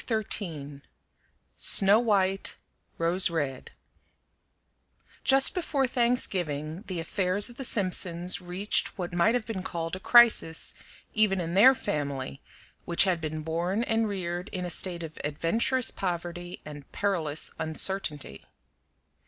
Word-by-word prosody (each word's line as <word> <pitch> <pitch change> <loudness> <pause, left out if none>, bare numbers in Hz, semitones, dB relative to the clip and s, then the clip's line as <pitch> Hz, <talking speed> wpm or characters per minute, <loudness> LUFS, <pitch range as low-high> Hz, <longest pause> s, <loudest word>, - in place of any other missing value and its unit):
XIII 165 - -2 0.8
SNOW 200 +3 +4
WHITE; 195 -4 0 0.4
ROSE 175 +3 +3
RED 145 -6 -3 1.5
Just 270 0 +5
before 295 -7 0
Thanksgiving 185 - -1
the 185 -3 -4
affairs 185 +5 +1
of 240 - -17
the 270 - -5
Simpsons 185 -4 0
reached 180 +4 -1
what 180 -2 -5
might 175 +7 +3
have 240 -3 -1
been 215 -5 -4
called 165 -2 -4
a - - -7
crisis, 230 -7 +5 0.4
even 210 -3 +2
in 170 -1 -3
their 250 +8 +7
family, 140 - -4 0.4
which 170 - +4
had 180 -4 0
been 155 0 -4
born 175 +7 -1
and 225 -1 0
reared 180 -1 -4
in 180 -2 -5
a 175 - -4
state 175 -1 -2
of 160 -1 -9
adventurous 220 - +1
poverty 175 -1 -5
and 145 -2 -11
perilous 165 -7 -1
uncertainty. 160 -1 -3
180 Hz, 125 wpm, -27 LUFS, 165-205 Hz, 1.5 s, their